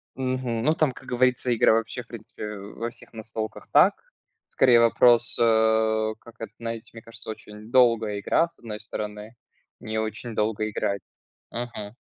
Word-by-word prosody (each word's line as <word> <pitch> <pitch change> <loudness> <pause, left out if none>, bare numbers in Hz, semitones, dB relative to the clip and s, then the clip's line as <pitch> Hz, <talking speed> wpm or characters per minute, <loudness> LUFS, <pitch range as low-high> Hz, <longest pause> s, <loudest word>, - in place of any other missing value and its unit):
Мгм, 130 -3 -2
ну 155 +5 +4
там, 155 -4 +2
как - - -14
говорится, 125 0 +2
игра 110 - +5
вообще, 115 +2 -1
в 115 - -29
принципе, 105 -2 -8
во 105 +4 -6
всех 120 - -17
настолках 110 -1 -6
так. - - +6 0.6
Скорее, 120 -2 +5
вопрос, 120 0 +4
э, - - +5 0.8
как 115 -1 -16
на 115 - -3
это - - -22
знаете, 115 -1 -5
мне 115 - -10
кажется, 115 0 -12
очень 105 +1 -9
долгая 115 -5 +4
игра, 165 +11 +2
с - - -25
одной 110 -3 -7
стороны, 105 +1 -6 0.4
не 110 0 -4
очень 110 +1 -4
долго 110 0 0
играть. 100 -1 -2 0.5
Мгм. 120 -3 -6
115 Hz, 165 wpm, -25 LUFS, 110-120 Hz, 0.8 s, так